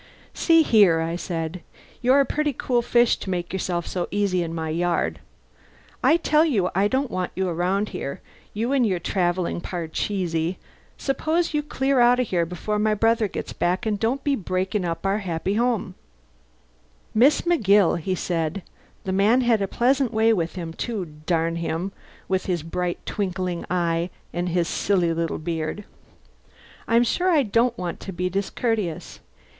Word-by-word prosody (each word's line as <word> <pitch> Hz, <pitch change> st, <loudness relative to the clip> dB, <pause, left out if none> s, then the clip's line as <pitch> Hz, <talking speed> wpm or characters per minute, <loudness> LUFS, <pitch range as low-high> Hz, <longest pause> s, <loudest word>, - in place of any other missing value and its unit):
"See 330 Hz, -1 st, +4 dB
here," 200 Hz, -, +5 dB
I 165 Hz, +1 st, -2 dB
said. 170 Hz, 0 st, -4 dB, 0.4 s
"You're 260 Hz, +3 st, +5 dB
a -, -, +2 dB
pretty 300 Hz, +2 st, -1 dB
cool 245 Hz, -1 st, 0 dB
fish 240 Hz, 0 st, +3 dB
to -, -, -7 dB
make 175 Hz, -1 st, -3 dB
yourself 175 Hz, -2 st, -2 dB
so 180 Hz, -2 st, -3 dB
easy 200 Hz, -3 st, +1 dB
in 165 Hz, -1 st, -3 dB
my 160 Hz, -1 st, -3 dB
yard. 170 Hz, +2 st, 0 dB, 0.8 s
I 325 Hz, -, +5 dB
tell 310 Hz, -2 st, +3 dB
you 215 Hz, -, +1 dB
I 195 Hz, +3 st, +3 dB
don't 265 Hz, +3 st, -1 dB
want 185 Hz, -1 st, -2 dB
you 190 Hz, 0 st, 0 dB
around 180 Hz, +4 st, 0 dB
here, 140 Hz, -, -5 dB, 0.3 s
you 230 Hz, +5 st, -2 dB
and 275 Hz, -2 st, +3 dB
your 195 Hz, -5 st, +1 dB
travelling 175 Hz, 0 st, -1 dB
parcheesi. 170 Hz, 0 st, -2 dB, 0.4 s
Suppose 315 Hz, +5 st, 0 dB
you 300 Hz, -, +1 dB
clear 275 Hz, -2 st, 0 dB
out 245 Hz, +1 st, +5 dB
of 250 Hz, -, 0 dB
here 170 Hz, -2 st, +1 dB
before 210 Hz, +5 st, -3 dB
my 215 Hz, 0 st, +2 dB
brother 225 Hz, +1 st, +2 dB
gets -, -, -6 dB
back 180 Hz, +6 st, 0 dB
and 210 Hz, -2 st, 0 dB
don't 250 Hz, +6 st, 0 dB
be 285 Hz, -1 st, +2 dB
breaking 190 Hz, -1 st, -2 dB
up 170 Hz, +2 st, -3 dB
our 195 Hz, +2 st, +1 dB
happy 185 Hz, 0 st, -2 dB
family." 230 Hz, -5 st, 0 dB, 1.2 s
"Miss 260 Hz, +7 st, +5 dB
McGill," 205 Hz, -, +3 dB
he 185 Hz, +3 st, -2 dB
said 170 Hz, +1 st, -2 dB, 0.4 s
(the 190 Hz, -, -3 dB
man 205 Hz, +7 st, +4 dB
had 235 Hz, -4 st, +2 dB
a 195 Hz, -, 0 dB
pleasant 255 Hz, +3 st, +1 dB
way 225 Hz, 0 st, +3 dB
with 170 Hz, -5 st, -2 dB
him, 170 Hz, -3 st, -5 dB
too 215 Hz, -1 st, -3 dB, 0.2 s
darn 165 Hz, -1 st, +1 dB
him 170 Hz, +3 st, -2 dB, 0.4 s
with 190 Hz, -1 st, -1 dB
his 175 Hz, -4 st, -1 dB
bright, 175 Hz, +2 st, -2 dB
twinkling 185 Hz, -3 st, -2 dB
eye 170 Hz, -1 st, 0 dB, 0.2 s
and 175 Hz, +1 st, -1 dB
his 170 Hz, -1 st, +1 dB
silly 180 Hz, -4 st, +1 dB
little 165 Hz, 0 st, -2 dB
beard), 160 Hz, +4 st, -3 dB, 1.0 s
"I'm 235 Hz, +1 st, +4 dB
sure 360 Hz, +10 st, +1 dB
I 310 Hz, -5 st, +4 dB
don't 235 Hz, +2 st, +1 dB
want 175 Hz, -2 st, -4 dB
to 195 Hz, -, -7 dB
be 180 Hz, 0 st, -2 dB
discourteous. 200 Hz, -2 st, -2 dB
190 Hz, 170 wpm, -24 LUFS, 175-235 Hz, 1.2 s, here